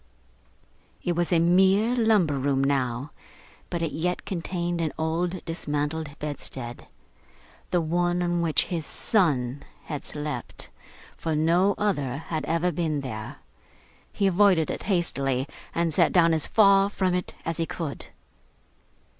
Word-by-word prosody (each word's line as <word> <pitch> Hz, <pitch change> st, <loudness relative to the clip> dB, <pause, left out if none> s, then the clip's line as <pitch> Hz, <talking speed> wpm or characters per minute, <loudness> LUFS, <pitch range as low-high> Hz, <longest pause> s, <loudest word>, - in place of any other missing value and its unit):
It 175 Hz, -, 0 dB
was 175 Hz, +1 st, 0 dB
a 175 Hz, -, +5 dB
mere 190 Hz, +7 st, +4 dB
lumber 210 Hz, -, +3 dB
room 135 Hz, 0 st, +1 dB
now, 135 Hz, 0 st, 0 dB, 0.6 s
but 170 Hz, -1 st, -2 dB
it 160 Hz, -, -1 dB
yet 180 Hz, +3 st, -2 dB
contained 175 Hz, -1 st, -2 dB
an 160 Hz, -2 st, 0 dB
old 170 Hz, +3 st, -1 dB
dismantled 155 Hz, -1 st, -2 dB
bedstead; 135 Hz, -5 st, -5 dB, 0.8 s
the 175 Hz, -1 st, +2 dB
one 175 Hz, +2 st, +1 dB
on 175 Hz, 0 st, 0 dB
which 165 Hz, -3 st, +2 dB
his 165 Hz, -4 st, -4 dB
son 145 Hz, -, +1 dB, 0.2 s
had 150 Hz, -3 st, -5 dB
slept; 150 Hz, -5 st, -5 dB, 0.5 s
for 160 Hz, -1 st, -2 dB
no 175 Hz, +6 st, +3 dB
other 145 Hz, -11 st, 0 dB
had 160 Hz, 0 st, -4 dB
ever 170 Hz, +2 st, +1 dB
been 155 Hz, -3 st, -1 dB
there. 110 Hz, -5 st, -6 dB, 0.8 s
He 200 Hz, -, 0 dB
avoided 190 Hz, -3 st, +4 dB
it -, -, -5 dB
hastily, 140 Hz, -8 st, 0 dB, 0.3 s
and 170 Hz, -1 st, +1 dB
sat 170 Hz, +1 st, +4 dB
down 170 Hz, -2 st, +5 dB
as 160 Hz, -2 st, 0 dB
far 200 Hz, -2 st, +5 dB
from 190 Hz, -3 st, 0 dB
it 180 Hz, 0 st, -2 dB
as 165 Hz, 0 st, -2 dB
he 165 Hz, -1 st, -1 dB
could. 160 Hz, -5 st, -5 dB
165 Hz, 140 wpm, -26 LUFS, 145-180 Hz, 0.8 s, a